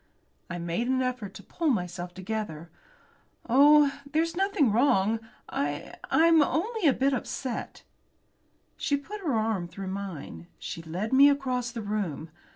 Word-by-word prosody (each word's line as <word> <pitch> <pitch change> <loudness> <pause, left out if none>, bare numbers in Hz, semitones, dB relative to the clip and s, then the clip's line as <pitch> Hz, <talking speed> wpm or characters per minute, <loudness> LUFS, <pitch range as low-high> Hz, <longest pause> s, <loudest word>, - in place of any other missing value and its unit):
I 175 - -4
made 170 +7 -2
an 260 0 +1
effort 245 -6 -4
to - - -10
pull 330 -2 -1
myself 180 -5 -2
together. 185 -5 -5 0.8
"Oh! 285 +3 +6
there's 325 +2 +1
nothing 385 - +2
wrong. 220 -2 +3 0.3
I 145 +1 -3 0.2
I'm 330 -1 +5
only 395 +6 +1
a - - +7
bit 270 +2 +1
upset." 255 -1 -4 0.9
She 285 - 0
put 405 +9 -8
her 300 -10 0
arm 215 -5 0
through 190 +2 -7
mine. 180 - -6
She 165 - -6
led 180 +8 -4
me 280 +2 +8
across 255 -3 0
the 230 -2 -6
room. 190 -7 -3
230 Hz, 145 wpm, -28 LUFS, 185-285 Hz, 0.9 s, me